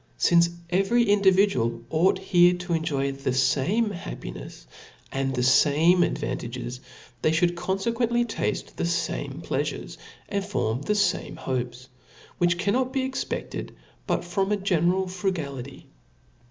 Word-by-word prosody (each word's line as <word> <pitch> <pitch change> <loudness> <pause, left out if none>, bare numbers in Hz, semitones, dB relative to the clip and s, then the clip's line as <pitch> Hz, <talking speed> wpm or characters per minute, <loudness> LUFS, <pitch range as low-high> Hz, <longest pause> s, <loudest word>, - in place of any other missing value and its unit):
Sincf 170 0 +4 0.2
every 195 +6 +3
individual 190 - +3
ought 185 +5 +3
here 180 -2 +4
to 180 -1 -4
enjoy 140 -4 0
the 135 -1 -3
fame 140 - +1
happinefs 170 - -8 0.5
and 135 -1 -1
the 125 - 0
fame 155 +7 +5
advantages, 125 -5 -3 0.4
they - - +3
ftould 165 +2 +3
confequently 230 +7 0
tafte 225 - -3
the - - -1
fame 170 0 -2
pleafures - - -3 0.3
and 200 -1 -2
fornv 135 - -2
the 210 - +1
fame 205 - 0
hopes; 125 -1 -4 0.5
which 175 0 +3
cannot 235 +8 0
be 260 -1 0
cxpefted 265 - -5 0.3
but - - 0
from 195 +3 -1
a 210 - +2
general 185 -1 +1
frus 185 +1 -1
ality. 140 -3 -7
175 Hz, 130 wpm, -25 LUFS, 135-200 Hz, 0.5 s, fame